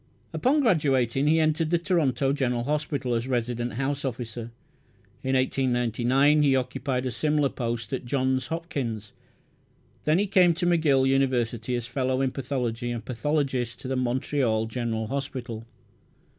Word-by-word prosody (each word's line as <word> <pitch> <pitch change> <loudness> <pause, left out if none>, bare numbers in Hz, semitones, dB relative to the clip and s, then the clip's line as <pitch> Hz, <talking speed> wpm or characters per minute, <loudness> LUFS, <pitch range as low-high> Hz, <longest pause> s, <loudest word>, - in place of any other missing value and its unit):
Upon 285 +4 +2
graduating 140 - +2
he 160 +2 +4
entered 155 0 +1
the 170 - +3
Toronto 140 -7 +1
General 125 -4 0
Hospital 145 -2 -1
as 115 +2 -1
resident 120 -1 -1
house 135 +4 -2
officer; 120 -3 -4 0.7
in 130 0 0
1899 130 +2 +2
he 140 -2 +4
occupied 130 0 -1
a 130 - -1
similar 150 0 +1
post 120 0 -4
at 130 - -2
Johns 130 0 0
Hopkins. 130 -11 -4 0.9
Then 155 +2 +3
he 200 - +2
came 180 -4 +4
to 175 +1 -1
McGill 155 -6 +3
University 125 -3 +1
as 120 -1 -3
fellow 130 +1 -1
in 135 -1 +1
pathology 125 -3 -3
and 115 -2 -4
pathologist 130 -3 -1
to - - -6
the 130 - -1
Montreal 125 -2 0
General 115 -1 -2
Hospital. 125 -3 -5
130 Hz, 145 wpm, -26 LUFS, 120-145 Hz, 0.9 s, he